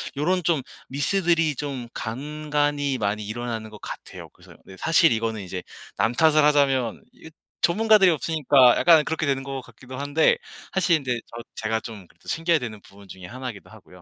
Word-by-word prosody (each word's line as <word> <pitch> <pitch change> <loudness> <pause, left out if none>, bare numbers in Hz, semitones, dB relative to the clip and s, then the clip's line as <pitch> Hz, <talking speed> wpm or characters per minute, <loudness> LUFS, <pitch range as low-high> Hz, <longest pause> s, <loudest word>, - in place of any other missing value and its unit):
요런 180 +6 +1
좀 160 -3 +1 0.3
미스들이 165 +2 +1
좀 130 -4 -5
간간이 145 +2 -2
많이 105 -1 -2
일어나는 115 0 -5
것 105 -1 -12
같아요. - - -9
그래서 - - -18
네 95 - -13
사실 165 - +4
이거는 110 -1 -1
이제 90 -1 -6 0.3
남 115 - +1
탓을 155 +2 +4
하자면 135 -5 +2
이 - - -14 0.3
전문가들이 210 +1 +5
없으니까 145 -5 +4
약간 165 -3 +6
그렇게 160 0 -2
되는 135 -2 0
것 135 -1 -5
같기도 130 0 -12
한데 145 +3 +2 0.4
사실 185 -3 +3
근데 125 -2 -1
저 115 0 -9
제가 110 0 -2
좀 105 -6 -10
그래도 - - -24
챙겨야 165 0 +2
되는 115 -7 -6
부분 100 0 -17
중의 95 -1 -10
하나이기도 125 -2 -8
하고요. 90 -4 -16
135 Hz, 380 characters per minute, -24 LUFS, 115-155 Hz, 0.4 s, 약간